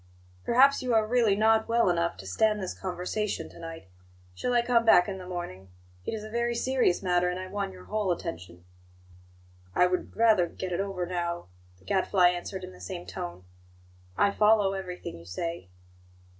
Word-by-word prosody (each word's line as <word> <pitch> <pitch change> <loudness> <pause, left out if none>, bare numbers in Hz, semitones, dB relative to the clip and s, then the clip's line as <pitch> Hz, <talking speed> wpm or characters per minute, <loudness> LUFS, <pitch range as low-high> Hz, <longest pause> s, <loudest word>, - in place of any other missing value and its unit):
"Perhaps 270 +3 +5
you 250 -2 0
are 220 -1 +4
really 225 -3 +3
not 220 +1 +3
well 230 -1 +3
enough 170 -1 +1
to 95 - -10
stand 210 - +1
this 185 -2 -4
conversation 190 +3 -3
to - - -14
night. 165 - -8 0.5
Shall 245 - -2
I 240 -1 +4
come 240 -1 +3
back 180 -6 +6
in 190 -2 -5
the 180 - -9
morning? 175 - -6 0.4
It - - -1
is 215 - -6
a 215 - -8
very 235 +1 0
serious 245 -7 +1
matter, 180 -1 +2
and 180 +1 -3
I 185 - -5
want 195 +1 -3
your 185 -1 -12
whole 210 -3 -1
attention." 90 - -6 1.1
"I 180 - +5
would 180 0 -2
rather 220 -6 +4
get 185 +2 -6
it 175 - -1
over 195 -2 -2
now," 175 - -3 0.3
the 95 - -24
Gadfly 185 - +3
answered 180 +2 -4
in - - -8
the 90 - -15
same 90 -1 -6
tone. 90 -1 -7 0.7
"I 200 - +4
follow 210 -2 +4
everything 180 - -6
you 85 - -14
say." 165 - -5
185 Hz, 185 wpm, -28 LUFS, 170-215 Hz, 1.1 s, back